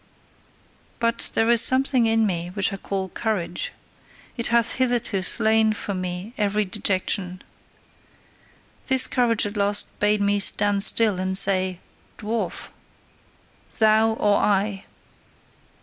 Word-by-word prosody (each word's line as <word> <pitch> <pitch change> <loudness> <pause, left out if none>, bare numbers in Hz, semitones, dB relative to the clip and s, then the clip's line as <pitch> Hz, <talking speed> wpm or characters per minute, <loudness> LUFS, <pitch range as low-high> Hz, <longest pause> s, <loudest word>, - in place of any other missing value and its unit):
But 230 0 -1
there 225 - +1
is 235 -1 +6
something 260 -2 +3
in 225 0 +1
me 175 -4 -3
which 200 0 -1
I - - -5
call 195 -1 -5
courage: 185 -5 -4 0.6
it 235 - -4
hath 235 -1 +1
hitherto 240 -6 -1
slain 220 +2 +2
for 205 -1 -6
me 185 +3 -6
every 210 0 0
dejection. 185 -1 -2 1.4
This 265 -1 +4
courage 235 -4 0
at 205 +1 -6
last 205 0 +1
bade 210 0 +1
me 205 0 0
stand 205 0 +2
still 210 -2 +4
and 190 0 +1
say: 185 -2 +2 0.4
"Dwarf! 220 +2 -4 1.1
Thou! 220 0 +3
Or 205 -2 +1
I!" 200 -1 -1
210 Hz, 120 wpm, -22 LUFS, 195-225 Hz, 1.4 s, is